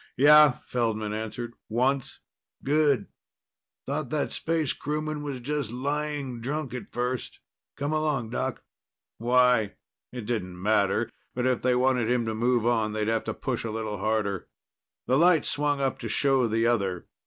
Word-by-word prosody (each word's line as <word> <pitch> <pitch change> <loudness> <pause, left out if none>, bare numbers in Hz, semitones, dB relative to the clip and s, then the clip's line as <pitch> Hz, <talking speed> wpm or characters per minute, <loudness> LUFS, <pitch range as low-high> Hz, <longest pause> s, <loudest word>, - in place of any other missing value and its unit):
"Yeah," 150 -1 +7
Feldman 110 -3 -1
answered. 110 +2 -5 0.2
"Once." 130 +4 0 0.4
"Good. 145 -6 +2 0.8
Thought 140 -1 -2
that 150 +1 -1
space 160 -3 -1
crewman 155 +1 -3
was 140 -3 -4
just 140 -1 -3
lying 140 0 -3
drunk 140 +1 -3
at 125 - -6
first. 125 +1 -3 0.4
Come 145 +2 -1
along, 150 -7 0
Doc." - - -3 0.6
"Why?" 125 -2 +3 0.4
It 125 -3 -6
didn't 90 -6 -3
matter, 100 0 +2 0.3
but 125 0 -1
if 130 -2 +1
they 125 0 +2
wanted 125 -2 +2
him 120 -1 +1
to 110 - -2
move 120 +1 +1
on, 110 -3 +1
they'd 110 0 -1
have 115 -1 0
to - - -3
push 125 -3 -3
a 115 - -3
little 110 -2 -4
harder. 105 -2 -1 0.6
The 130 +3 +3
light 170 -3 +5
swung 145 -1 0
up 135 -1 0
to - - -5
show 135 -3 +2
the 115 +1 +1
other. 100 -7 0
125 Hz, 155 wpm, -27 LUFS, 110-145 Hz, 0.8 s, Yeah